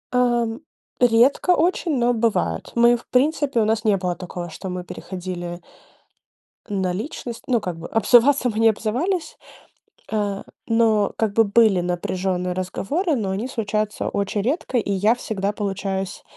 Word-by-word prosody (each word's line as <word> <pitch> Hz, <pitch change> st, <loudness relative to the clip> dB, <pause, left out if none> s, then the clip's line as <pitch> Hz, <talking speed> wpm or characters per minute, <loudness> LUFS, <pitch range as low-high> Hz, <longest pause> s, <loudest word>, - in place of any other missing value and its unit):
Ам, 240 Hz, -2 st, +1 dB, 0.4 s
редко 245 Hz, +8 st, +4 dB
очень, 335 Hz, -3 st, +1 dB
но 245 Hz, 0 st, +2 dB
бывает. 230 Hz, -1 st, -1 dB
Мы 235 Hz, 0 st, +5 dB
в -, -, -16 dB
принципе 280 Hz, -1 st, +1 dB
у -, -, +2 dB
нас 220 Hz, 0 st, 0 dB
не 210 Hz, -3 st, +3 dB
было 180 Hz, -1 st, -2 dB
такого, 175 Hz, -1 st, -7 dB
что 185 Hz, +4 st, -7 dB
мы 180 Hz, 0 st, -4 dB
переходили 175 Hz, -1 st, -6 dB, 1.1 s
на 190 Hz, -3 st, -1 dB
личность. 235 Hz, -, -6 dB
Ну, 245 Hz, -3 st, +2 dB
как 180 Hz, -5 st, -5 dB
бы 165 Hz, -, -7 dB
обзываться 245 Hz, +4 st, +4 dB
мы 215 Hz, -, -5 dB
не 225 Hz, -, +6 dB
обзывались. 255 Hz, -, -2 dB, 0.8 s
А, 205 Hz, -2 st, -1 dB, 0.2 s
но 225 Hz, -2 st, +2 dB
как 220 Hz, -2 st, 0 dB
бы 225 Hz, -, +6 dB
были 210 Hz, -2 st, +4 dB
напряженные 180 Hz, +1 st, -2 dB
разговоры, 270 Hz, -, -1 dB
но 205 Hz, -5 st, -2 dB
они 210 Hz, +7 st, -2 dB
случаются 215 Hz, -3 st, -2 dB
очень 200 Hz, 0 st, -1 dB
редко, 260 Hz, -, -1 dB
и 205 Hz, -3 st, -1 dB
я 205 Hz, +4 st, +3 dB
всегда 205 Hz, -4 st, -2 dB
получаюсь 195 Hz, -2 st, -3 dB
215 Hz, 150 wpm, -22 LUFS, 190-240 Hz, 1.1 s, не